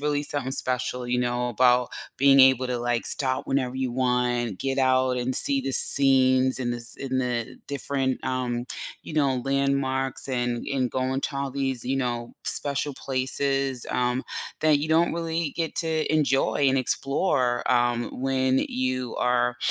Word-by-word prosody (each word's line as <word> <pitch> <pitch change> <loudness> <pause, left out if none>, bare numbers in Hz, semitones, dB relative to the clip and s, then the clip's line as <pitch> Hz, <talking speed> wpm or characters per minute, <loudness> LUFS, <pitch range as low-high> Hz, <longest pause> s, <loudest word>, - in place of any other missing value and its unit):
really 145 0 0
something 140 -2 -2
special, 125 -1 -2
you 125 0 0
know, 125 0 +1 0.3
about 125 -1 +4 0.3
being 135 0 +5
able 130 -1 +5
to, 125 -1 -2
like, 120 0 -1
stop 130 -2 -1
whenever 130 -2 -1
you 130 -1 -2
want, 125 -3 -1
get 135 0 -2
out 130 -1 +2
and 125 +1 -2
see 140 -1 +4
the 135 0 -4
scenes 130 -1 +4
in 120 -1 -1
this 120 -1 -1
in 130 -1 -3
the 125 0 -3
different, 135 -2 -2
um, 125 -2 -2 0.4
you - - -9
know, 135 -5 +1
landmarks 135 -1 0
and 120 -2 -2
and 130 -3 0
going 130 +1 -1
to 140 - -4
all 140 0 -2
these, 135 -3 -1
you 135 +2 -1
know, 120 -2 -3
special 140 0 -1
places, 135 0 -1
um, 125 +1 0 0.4
that 155 -2 +4
you 150 +2 -3
don't 165 +2 +3
really 165 -2 -2
get 165 -2 -2
to 160 -3 -1
enjoy 140 -1 +1
and 135 0 +2
explore, 130 -2 0
um, 120 -1 +1
when 130 0 0
you 130 -1 -3
are, 125 0 +1
130 Hz, 160 wpm, -25 LUFS, 125-140 Hz, 0.4 s, being